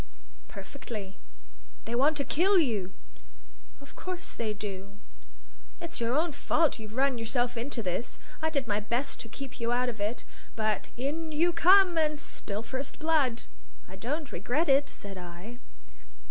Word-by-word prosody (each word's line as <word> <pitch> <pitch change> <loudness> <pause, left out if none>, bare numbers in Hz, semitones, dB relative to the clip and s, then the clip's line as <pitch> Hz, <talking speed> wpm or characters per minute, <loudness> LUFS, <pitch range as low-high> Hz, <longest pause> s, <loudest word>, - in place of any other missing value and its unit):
"Perfectly." 215 -8 -7 0.7
"They 230 - -4
want 285 +5 +4
to 280 - +1
kill 375 +8 +4
you!" 215 - +2 0.9
"Of 280 - -14
course 370 0 -5
they 225 -2 -1
do." 200 -1 -6 0.9
"It's 335 -5 -5
your 235 +2 +2
own 330 +2 +2
fault; 305 0 +2
you've 215 0 -8
run 265 -2 +2
yourself 240 +2 0
into 235 0 -2
this. 185 +5 -2 0.2
I 315 - +2
did 280 -4 0
my 205 -1 +2
best 235 +6 -2
to 225 - -7
keep 270 +3 -7
you 235 0 0
out 250 +1 +2
of 225 -3 -6
it. 210 +4 -1 0.3
But 215 -2 0
in 310 +5 -2
you 335 +3 +3
come, 365 -1 +7
and 305 -1 +2
spill 210 -6 -5
first 265 +3 -5
blood." 300 -7 +2 0.4
"I 190 - -10
don't 275 +9 -3
regret 250 - 0
it," 275 +1 +5
said 195 -2 -8
I. 180 +7 -9
250 Hz, 160 wpm, -30 LUFS, 215-305 Hz, 0.9 s, come